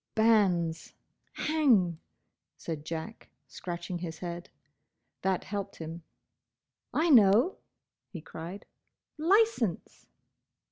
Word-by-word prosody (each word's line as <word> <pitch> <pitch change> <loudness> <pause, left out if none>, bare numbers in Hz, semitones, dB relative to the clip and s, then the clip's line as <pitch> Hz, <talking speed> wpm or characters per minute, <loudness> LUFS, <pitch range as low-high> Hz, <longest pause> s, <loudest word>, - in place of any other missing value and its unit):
"Banns—! 190 -8 +2 0.4
Hang!" 235 - +2 0.6
said 155 -2 -6
Jack, 165 +7 -6 0.2
scratching 175 0 -5
his 165 -2 -5
head. 175 -1 -6 0.7
That 190 -1 0
helped 200 -1 -5
him. 165 +1 -7 0.9
"I 325 +1 +2
know!" 230 - +6 0.5
he 180 - -7
cried, 165 +5 -8 0.5
"Licence!" 355 - +1
185 Hz, 85 wpm, -30 LUFS, 170-230 Hz, 0.9 s, know